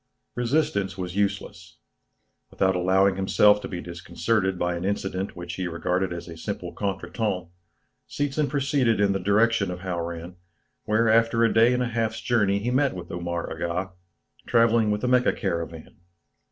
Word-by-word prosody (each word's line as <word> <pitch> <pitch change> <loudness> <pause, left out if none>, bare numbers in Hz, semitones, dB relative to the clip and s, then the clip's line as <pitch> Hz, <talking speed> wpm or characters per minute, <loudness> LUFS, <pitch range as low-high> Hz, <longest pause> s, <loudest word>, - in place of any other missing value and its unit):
Resistance 115 -7 0
was 90 -1 -5
useless. 100 -1 -3 0.7
Without 95 0 +1
allowing 95 +2 +3
himself 105 +2 +4
to - - -5
be 90 -2 -5
disconcerted 95 +3 -1
by 90 0 0
an 85 - -4
incident 95 -1 -2
which 85 0 -7
he 95 -1 -2
regarded 90 +2 -1
as 85 0 -6
a 85 - -8
simple 80 - -5
contretemps, 100 -2 -3 0.6
Seetzen 145 +1 -1
proceeded 135 -6 +1
in 100 -1 +3
the 95 - 0
direction 105 +2 +2
of 90 0 -6
Hauran, 85 -1 -5 0.5
where 110 +2 +2
after 115 +1 +3
a 115 - +3
day 115 +2 +5
and 125 0 +1
a - - -1
half's 115 -1 -1
journey 105 -5 +2
he 115 +5 -2
met 135 -2 +2
Omar 85 -1 -4
Aga, 90 +3 -3 0.6
travelling 115 -2 +4
with 105 0 0
the 125 - -1
Mecca 125 0 +3
caravan. 85 -5 -4
100 Hz, 155 wpm, -25 LUFS, 90-115 Hz, 0.7 s, day